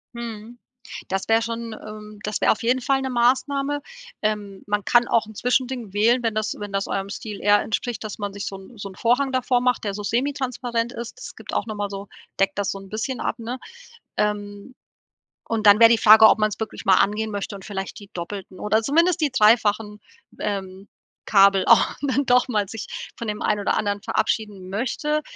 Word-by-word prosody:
Mhm, 235 0 -7 0.5
das 195 0 -2
wäre 225 0 +4
schon, 230 0 -4
ähm, 215 -1 -10
das 210 0 -3
wäre - - +5
auf 220 - -1
jeden 250 +3 +1
Fall 270 +2 +1
'ne 265 - -2
Maßnahme. 275 +4 +1 0.4
Ähm, 210 -2 -2
man 205 -1 -1
kann 240 0 +4
auch 225 - +2
'n 220 - -12
Zwischending 250 -2 -1
wählen, 230 +4 +3
wenn 225 -2 -1
das 215 0 -1
wenn 205 -1 -6
das 195 0 -1
eurem 195 0 -3
Stil 210 0 -7
eher 205 +1 +5
entspricht, 230 +2 -3
dass 215 -1 -6
man 205 -1 -3
sich 200 0 -6
so 195 - -5
'n 195 +5 -14
so 200 -1 -6
'n 190 - -13
Vorhang 250 +4 +1
davor 255 -1 +1
macht, 250 -2 +1
der 200 -2 -2
so 210 - -5
semi-transparent 245 0 -1
ist. 235 - -7
Das - - -9
gibt - - -9
auch - - 0
noch 215 -2 -5
mal 205 -1 -3
so 200 0 -7 0.3
deckt 195 +1 +1
das 200 - 0
so - - -3
'n 195 0 -12
bisschen 225 +5 -3
ab, 235 - -2
ne? 235 +3 -5 0.6
Ähm, 205 +3 -2 0.7
und 225 -2 -2
dann 205 +1 +8
wär 230 -1 +9
die 230 - +5
Frage, 220 -1 +8
ob - - +5
man's 215 0 0
wirklich 220 0 -6
mal 190 -1 +5
angehen 215 +2 +1
möchte 200 0 -4
und 195 - -11
vielleicht 195 -1 -5
die 200 0 -13
doppelten 185 +2 -7
oder 220 +1 +1
zumindest 335 +6 +2
die 295 - +2
dreifachen, 210 -2 +3 0.4
ähm, 195 -1 -4 0.4
Kabel 195 -1 +5
auch - - +5
dann 280 0 0
doch 250 +1 +4
mal 210 -4 0
sich 225 -2 -6 0.3
von 230 - -5
dem 210 0 -3
einen 210 -1 +1
oder - - 0
anderen 205 -1 -1
verabschieden 205 -4 -2
möchte. 285 +9 -1
215 Hz, 210 wpm, -23 LUFS, 205-240 Hz, 0.7 s, wär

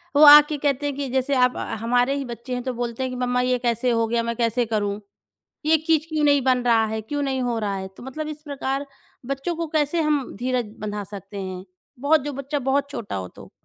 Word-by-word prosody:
वो 295 - +7
आके 295 0 +9
कहते 285 0 0
हैं 285 -2 -1
कि 280 -2 -3
जैसे 265 +2 +1
आप 250 -1 +3 0.2
हमारे 245 +3 +2
ही 280 - -3
बच्चे 240 +1 -7
हैं 245 - -3
तो 255 -1 -2
बोलते 240 +1 -3
हैं 255 - -2
कि, 255 - -5
"मम्मा 250 0 +1
ये 250 0 +1
कैसे 240 0 0
हो 230 -1 +1
गया, 230 0 0
मैं 235 0 -2
कैसे 235 +1 +1
करूँ, 205 -2 -1 0.7
ये 320 +1 +5
चीज़ 320 -1 +2
क्यों 310 -1 0
नहीं 285 -1 +4
बन 255 -2 +2
रहा 230 -2 +4
है, 220 0 -3
क्यों 290 +7 -3
नहीं 265 -2 -1
हो 240 -2 -1
रहा 205 -2 -2
है?" 190 0 -5
तो - - -11
मतलब 300 +4 -5
इस 305 -1 -7
प्रकार 275 -1 -3 0.4
बच्चों 275 +6 -3
को 330 0 -3
कैसे 310 +2 +1
हम 295 -4 0
धीरज 245 -3 -2
बँधा 210 -1 -4
सकते 200 0 -9
हैं? 185 -1 -6 0.4
बहुत 290 +2 +3
जो 290 - -4
बच्चा 275 +2 -3
बहुत 275 +2 0
छोटा 230 - -5
हो 95 -1 -4
तो? - - -14
255 Hz, 235 wpm, -23 LUFS, 230-285 Hz, 0.7 s, आके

